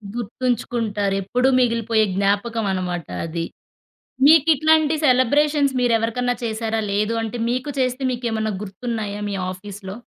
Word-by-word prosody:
గుర్తుంచుకుంటారెప్పుడు 230 -2 -1
మిగిలిపోయే 230 -2 +2
జ్ఞాపకం 205 +3 0
అన్నమాట 180 -3 -3 0.2
అది. 165 0 -3 0.8
మీకిట్లాంటి 315 0 +5
సెలబ్రేషన్స్ 285 +2 +3
మీరెవరికన్నా 245 +1 +1
చేసారా? 225 0 -2
లేదు 210 +3 0
అంటే 225 +2 -4
మీకు 255 +3 -2
చేస్తే 255 +1 0
మీకెమన్నా 225 -3 -2
గుర్తున్నాయా 210 0 -4
మీ - - -3 0.2
ఆఫీస్‌లో? 190 +1 -8
230 Hz, 100 wpm, -21 LUFS, 205-250 Hz, 0.8 s, మీకిట్లాంటి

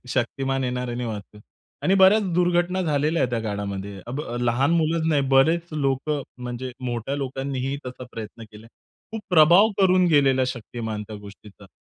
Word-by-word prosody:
शक्तिमान 135 +2 -1
येणार 125 0 -3
आणि 120 +1 -3
वाचवेल 105 -1 -7 0.4
आणि 190 - +3
बऱ्याच 195 +3 +6
दुर्घटना 175 +1 +1
झालेल्या 155 +1 +1
आहेत 125 - 0
त्या 120 -2 -1
काळामध्ये. 100 -2 -5
अब 130 +5 -4 0.2
लहान 120 +5 +1
मुलंच 165 -1 +1
नाही 150 -3 +3
बरेच 165 +5 +3
लोकं 140 0 -1 0.2
म्हणजे 125 +1 -5
मोठ्या 120 +3 -3
लोकांनीही 135 0 -3
तसा 125 0 -7
प्रयत्न 115 +1 -8
केला 105 +1 -14
आहे. - - -18 0.4
खूप 220 - -4
प्रभाव 175 +5 +6
करून 185 -1 +4
गेलेला 135 -3 +4
शक्तिमान 110 -3 -5
त्या 110 - -7
गोष्टीचा. 100 0 -14
135 Hz, 160 wpm, -24 LUFS, 120-160 Hz, 0.4 s, बऱ्याच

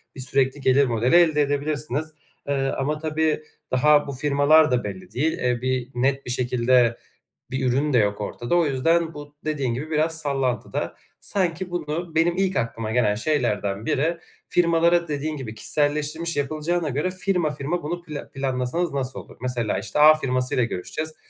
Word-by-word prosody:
bir - - -10
sürekli 135 +2 0
gelir 135 +2 +4
modeli 120 +4 +1
elde 160 -4 +5
edebilirsiniz. 145 0 -1 0.4
Eee, 140 - +1 0.2
ama 150 +3 -1
tabii 155 0 0 0.3
daha 145 +3 +4
bu 140 - -3
firmalar 145 +2 +4
da 125 -1 +1
belli 185 -1 -7
değil, 155 +5 +1
eee, 125 -1 0
bir 130 -1 -1
net 135 +2 0
bir 125 - -3
şekilde 125 -1 +2 0.5
bir 130 0 -1
ürün 140 +4 +1
de 125 - +4
yok 100 -1 +1
ortada. 120 +9 -2
O 170 -3 +3
yüzden 165 +5 +1
bu 145 0 -10
dediğin 140 -6 -1
gibi 150 +5 -5
biraz 160 +1 0
sallantıda. 135 -6 -2 0.3
Sanki 180 -2 -2
bunu 170 0 -4
benim 170 +2 +2
ilk 190 0 0
aklıma 115 -1 -2
gelen 110 -4 +2
şeylerden 110 -5 -1
biri, 165 +5 +1 0.3
firmalara 170 0 +3
dediğin 150 +1 -2
gibi 115 -5 -6
kişiselleştirmiş 150 +6 -1
yapılacağına 155 +3 -1
göre 150 +7 -1
firma 180 -3 0
firma 150 +5 -3
bunu 175 +4 -4
pla 150 -4 -8
planlasanız 135 +5 -1
nasıl 135 -2 -3
olur? - - -14
Mesela, 125 -4 -1
işte, - - -4
A 155 +1 +9
firmasıyla 130 -4 0
görüşeceğiz. 155 - -5
145 Hz, 165 wpm, -24 LUFS, 125-160 Hz, 0.5 s, A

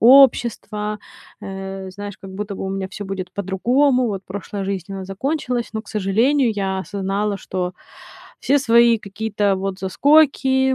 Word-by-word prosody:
общество. 225 -4 +4 0.4
Э, 195 0 -6
знаешь, 205 +1 -7
как 195 -2 -10
будто 205 +1 -4
бы 195 - -5
у - - -2
меня 195 0 -3
всё 205 +2 -7
будет 190 -2 -5
по-другому, 245 +8 +2
вот 195 -3 -3
прошлая 200 +1 -5
жизнь, 195 -1 -4
она 195 -1 -5
закончилась, 245 +4 -2
но, 220 - -2
к - - -19
сожалению, 230 +7 +2
я 195 -2 -1
осознала, 200 +1 -2
что 180 -1 -3 0.7
все 285 - +3
свои 235 -3 +5
какие-то 205 -1 -1
вот 190 0 -3
заскоки, 265 +4 +3
205 Hz, 150 wpm, -21 LUFS, 195-240 Hz, 0.7 s, свои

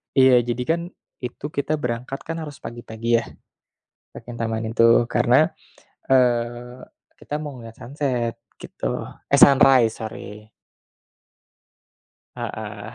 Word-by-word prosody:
Iya, 130 -2 +6
jadi 120 +1 -2
kan, 170 +1 +2 0.4
itu 125 +3 -7
kita 145 +1 -2
berangkat 125 +3 -3
kan 165 0 -5
harus 150 -4 -8
pagi-pagi 115 -1 -7
ya, - - -6 0.9
ke - - -12
Kintamani 115 -2 -3
itu. 115 +1 +5
Karena, - - +3 0.6
eee 125 0 +1 0.3
kita 150 +1 -5
mau 145 -3 -7
ngeliat 115 -2 -10
sunset 125 -4 -2 0.2
gitu - - -4 0.4
eh 140 - +5
sunrise 130 -4 +6
sorry. 105 0 -9 1.9
Heeh, 105 0 -6
120 Hz, 110 wpm, -22 LUFS, 115-135 Hz, 1.9 s, Iya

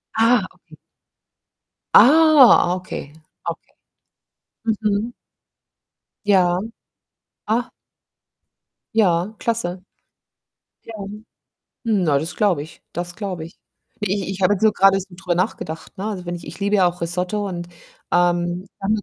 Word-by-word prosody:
Ah, 225 -2 +4
okay. - - -19 1.2
Ah, 290 - +7
okay, 185 -6 -7 0.4
okay. - - -9 0.9
Mhm. 220 +1 0 1.1
Ja. 180 -3 +3 0.9
Ah. 235 +3 0 1.3
Ja, 185 -1 +2
klasse. 185 -6 -2 1.0
Ja. 230 - -11 0.9
Na, 185 - +2
das 160 +5 -4
glaube 185 -9 +1
ich. 155 - -15
Das 175 0 -5
glaube 185 -6 -5
ich. 165 - -15 0.4
I 200 0 0
ich - - -6
ich 195 - -6
habe 185 +2 +4
jetzt 205 +1 -3
nur 215 - +5
gerade 195 0 +5
so 190 - -8
drüber 175 -1 -3
nachgedacht, 175 -4 -3
ne? 195 - -4
Also, 200 -4 -4
wenn 175 0 -3
ich 170 - -10
ich - - -9
liebe 200 +1 +1
ja 185 - +5
auch 175 0 -12
Risotto 180 +5 -2
und, 175 -2 -5 0.4
ähm, 175 +1 +1
dann 205 +3 +1
190 Hz, 125 wpm, -21 LUFS, 175-215 Hz, 1.3 s, Ah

